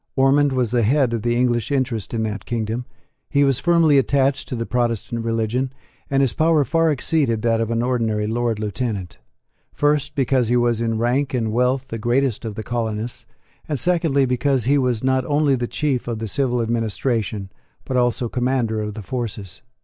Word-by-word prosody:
Ormond 140 +2 +4
was 125 -4 0
the 120 -1 +2
head 125 +2 +2
of 115 - -1
the 120 +1 0
English 120 -2 +1
interest 130 -7 -1
in 115 -1 -1
that 105 -2 -4
kingdom: 115 +1 -2 0.4
he 140 0 +3
was 135 -2 +2
firmly 165 -3 +4
attached 135 0 +1
to - - -3
the 115 -1 -3
Protestant 120 -1 -1
religion; 115 +3 -1 0.4
and 135 0 +2
his 130 -6 +1
power 155 0 +3
far 165 +2 +2
exceeded 135 -5 0
that 115 -1 +2
of 115 - -1
an 115 0 0
ordinary 115 -4 0
Lord 115 0 -1
Lieutenant, 105 - -4 0.5
first, 145 0 0
because 130 -3 +2
he 120 +2 +2
was 120 -1 +1
in 115 -1 0
rank 130 +4 0
and 110 -3 -1
wealth 125 +3 0
the 115 - -4
greatest 120 0 0
of 110 -2 -5
the 110 - -5
colonists, 115 0 -3 0.4
and, 145 -3 -1
secondly, 165 -6 +2
because 130 0 +1
he 140 +5 +3
was 125 -3 0
not 130 0 +2
only 145 -1 +2
the 120 -2 -1
chief 140 -4 -1
of 115 -2 -2
the 110 0 -4
civil 125 0 0
administration, 110 -3 -2 0.3
but 130 - -3
also 120 0 +1
commander 120 -3 0
of 105 -1 -4
the 110 - -7
forces. 100 -5 -5
120 Hz, 190 wpm, -21 LUFS, 115-135 Hz, 0.5 s, Ormond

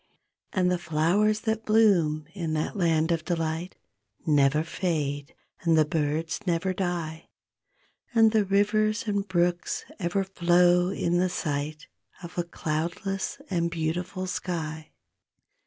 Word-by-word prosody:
And 180 -2 +2
the 180 - 0
flowers 185 +8 +2
that 220 0 -1
bloom 185 -9 +3
in 170 -5 -3
that 155 +6 -2
land 165 -3 +2
of 165 -2 0
delight 165 0 -2 0.5
Never 150 0 +3
fade, 150 -5 -2 0.3
and 165 -2 +3
the 155 - +5
birds 155 +1 -1
never 180 +2 +1
die; 170 -3 -3 0.8
And 225 -2 +5
the 215 -1 +3
rivers 210 +3 +1
and 200 -1 -1
brooks 175 -1 0
ever 185 +2 0
flow 180 -1 +3
in 175 -2 0
the 185 0 +2
sight 150 -2 -3 0.4
Of 170 - -9
a - - +2
cloudless 170 +4 -3
and 170 -2 +1
beautiful 175 +3 -2
sky. 160 -4 -4
175 Hz, 125 wpm, -27 LUFS, 160-190 Hz, 0.8 s, the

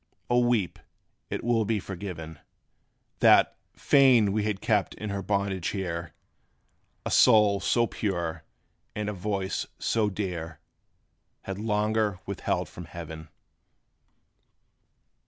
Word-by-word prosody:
O 120 - +5
weep! 120 -6 +1 0.5
it - - -4
will 115 -1 +2
be 110 0 0
forgiven, 85 -5 -7 0.8
That, - - +5 0.2
fain 125 -7 +5
we 105 +1 0
had 105 -2 -1
kept 105 -3 0
in 105 -1 -5
her 100 0 -2
bondage 100 -2 -1
here 85 -4 -4 0.9
A - - -2
soul 105 -2 +5
so 120 +3 +2
pure, 85 -8 -3 0.5
and 105 -1 -2
a - - -3
voice 95 0 -2
so 110 -2 +1
dear 90 -6 -4 0.8
Had 95 0 -5
longer 105 -1 0
withheld 100 - -2
from 90 - -10
heaven. 80 -2 -9
100 Hz, 115 wpm, -27 LUFS, 90-110 Hz, 0.9 s, O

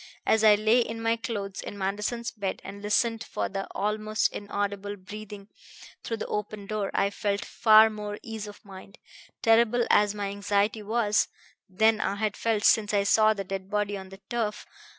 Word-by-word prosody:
As 220 0 +3
I 215 -1 +8
lay 215 +3 +3
in 225 -1 -2
my 225 0 +1
clothes 205 -4 -5
in 205 - -7
Manderson's 210 +5 -2
bed 200 -4 -4
and 200 +1 -8
listened 225 +2 +1
for - - -3
the 195 0 -4
almost 215 +1 0
inaudible 205 0 -3
breathing 205 +1 -10 0.6
through 230 - -3
the - - -4
open 210 -1 -4
door 210 -1 -2
I 200 - +1
felt 200 -1 -2
far 220 -1 +6
more 210 -1 -5
ease 220 -2 -6
of 205 0 -12
mind, 195 0 -12 0.5
terrible 235 +1 +4
as 205 0 +4
my 205 -1 -3
anxiety 205 +2 0
was, 210 0 +1 0.4
than 220 +3 +3
I 200 - -1
had 210 0 -1
felt 220 -2 0
since 210 -1 +4
I 200 - +3
saw 215 +2 +4
the 200 - -4
dead 195 0 -6
body 210 0 -1
on 190 -1 -8
the 195 - -11
turf. 220 -2 -2
210 Hz, 180 wpm, -27 LUFS, 200-220 Hz, 0.6 s, I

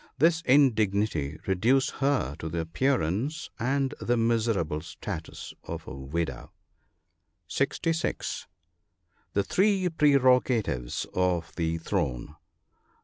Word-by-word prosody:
— - - -46
This 165 +3 +4
indignity 105 - +3
reduced 115 +8 +2
her 135 - +1
to 80 - -4
the 85 +1 -2
appearance 130 - -1
and 135 +2 0
the 120 0 +1
miserable 115 -9 +1
status - - -7
of - - -6
a - - -7
widow. 70 0 -4 1.0
(66.) 160 - -1 0.9
The 100 - +2
three 190 - +2
prerogatives 125 - +2
of 90 -2 0
the 80 -1 -1
throne. 75 -3 -2
115 Hz, 100 wpm, -28 LUFS, 80-140 Hz, 1.0 s, This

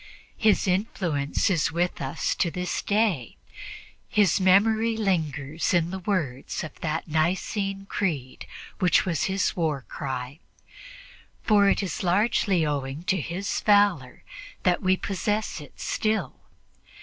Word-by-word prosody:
His 215 -3 +3
influence 180 -7 0
is 155 -5 +1
with 175 +2 -1
us 135 +4 -1
to 170 - 0
this 180 +1 -3
day, 200 - 0 0.7
his 205 -3 +3
memory 220 +4 +4
lingers 160 -6 -1
in 170 0 +1
the 190 - -4
words 170 -10 -2
of 155 - -7
that 160 +1 -3
Nicene 190 +5 -1
Creed 155 -11 -3 0.3
which 180 -3 +3
was 170 -4 0
his 195 0 0
war 155 -6 -1
cry; 130 0 -5 1.0
for 205 -2 +4
it 200 - +1
is 185 - -4
largely 190 -1 +2
owing 140 +1 -3
to 185 -1 0
his 180 +6 -3
valor 200 -11 +2 0.4
that 180 -2 +2
we 185 0 +2
possess 205 -1 -2
it 145 - -14
still. 215 0 -1
180 Hz, 125 wpm, -26 LUFS, 155-200 Hz, 1.0 s, memory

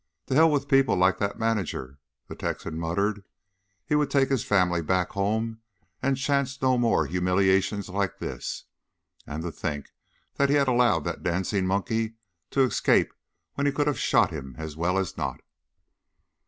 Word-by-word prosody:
"To - - -3
hell 160 +4 +6
with 145 -2 0
people 135 -1 +4
like 90 +1 +3
that 100 0 -1
manager!" 95 - -2 0.3
the - - -8
Texan 80 - -4
muttered. 100 +5 -1 0.6
He - - -2
would 150 -1 +2
take 135 -2 +2
his 135 -5 +1
family 90 -4 +2
back 90 +2 0
home 110 +3 -1 0.4
and 135 0 +1
chance 140 0 0
no 130 -1 +3
more 115 -9 +2
humiliations 95 +4 +1
like 95 -1 -2
this. - - -5 0.6
And 75 +3 -5
to 85 - -3
think 75 -1 -5 0.5
that 140 0 +3
he 145 - +4
had 140 -2 +3
allowed 120 - +3
that - - -4
dancing 95 +2 0
monkey 110 +4 -1 0.3
to 135 - +1
escape 130 - +2 0.4
when 140 0 0
he - - +3
could 145 +1 0
have 150 -1 0
shot - - +3
him 65 -2 -7
as 80 -2 -6
well 90 +4 0
as 95 -2 -2
not! 65 -5 -3
100 Hz, 170 wpm, -26 LUFS, 90-130 Hz, 0.6 s, hell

